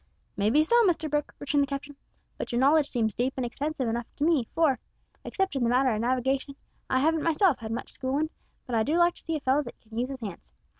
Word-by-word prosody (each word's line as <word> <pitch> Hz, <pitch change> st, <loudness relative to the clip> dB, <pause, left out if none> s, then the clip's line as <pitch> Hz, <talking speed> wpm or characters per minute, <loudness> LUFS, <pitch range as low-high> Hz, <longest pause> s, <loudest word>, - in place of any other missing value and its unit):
"May 200 Hz, +1 st, +2 dB
be 300 Hz, +7 st, +4 dB
so, 475 Hz, +8 st, +4 dB
Mr 320 Hz, -3 st, +1 dB
Brooke," 295 Hz, -1 st, -1 dB
returned 285 Hz, 0 st, +1 dB
the 280 Hz, -, +1 dB
captain, 280 Hz, +1 st, -5 dB, 0.4 s
"but -, -, -5 dB
your 240 Hz, -, 0 dB
knowledge 285 Hz, +3 st, +4 dB
seems 220 Hz, -4 st, 0 dB
deep 255 Hz, +5 st, -1 dB
and 255 Hz, -, -1 dB
extensive 275 Hz, +2 st, -3 dB
enough 235 Hz, +1 st, -2 dB
to 290 Hz, -, -3 dB
me, 310 Hz, -6 st, +3 dB
for, 300 Hz, -6 st, +3 dB, 0.4 s
except 385 Hz, -6 st, -1 dB
in 265 Hz, -, 0 dB
the 235 Hz, -, +2 dB
matter 255 Hz, +2 st, +3 dB
o' 220 Hz, -, 0 dB
navigation, 260 Hz, +3 st, 0 dB, 0.3 s
I 260 Hz, -, +2 dB
haven't 320 Hz, +2 st, +2 dB
myself 330 Hz, -, +3 dB
had 220 Hz, -1 st, -6 dB
much 235 Hz, -, -4 dB
schoolin', 280 Hz, +5 st, -1 dB, 0.3 s
but 250 Hz, -, -7 dB
I 225 Hz, -, +3 dB
do 300 Hz, +9 st, +1 dB
like 345 Hz, 0 st, +4 dB
to -, -, -15 dB
see 325 Hz, -, -3 dB
a 305 Hz, -, -3 dB
fellow 270 Hz, +2 st, +2 dB
that 240 Hz, -5 st, -10 dB
can 220 Hz, 0 st, -15 dB
use 250 Hz, +2 st, -1 dB
his 270 Hz, -2 st, -7 dB
hands. 185 Hz, -, -8 dB
270 Hz, 245 wpm, -27 LUFS, 240-310 Hz, 0.4 s, be